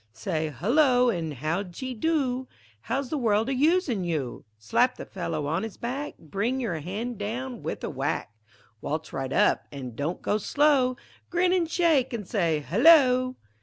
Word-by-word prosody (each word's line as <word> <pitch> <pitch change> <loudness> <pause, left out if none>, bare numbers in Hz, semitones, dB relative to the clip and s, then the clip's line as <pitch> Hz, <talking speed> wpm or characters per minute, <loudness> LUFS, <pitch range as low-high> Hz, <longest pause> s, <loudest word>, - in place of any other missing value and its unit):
Say 160 -4 -2
"hullo," 245 - +3
an' 165 -6 -3
"how 155 +7 -2
d'ye 205 +8 -6
do!" 260 -1 0 0.3
"How's 260 - -3
the 305 - 0
world 220 -1 +2
a - - +1
usin' 290 - +2
you?" 155 -8 -3
Slap 240 - +1
the - - -7
fellow 165 -5 -4
on 160 +5 0
his 225 -2 -6
back, 270 +5 -4
Bring 205 - -2
your 205 -11 -2
han' 210 +9 -4
down 235 +4 -4
with - - -5
a - - -2
whack; 105 - -2 0.5
Waltz 155 +2 -4
right 135 -1 -3
up, - - +2
an' 135 -4 -6
don't 145 +8 -3
go 210 - +1
slow, 270 0 +2 0.3
Grin 355 +1 +2
an' 350 -3 +2
shake 315 -7 +2
an' 210 -3 -5
say 170 -6 0
"hullo!" 255 - +5
230 Hz, 165 wpm, -26 LUFS, 165-265 Hz, 0.5 s, hullo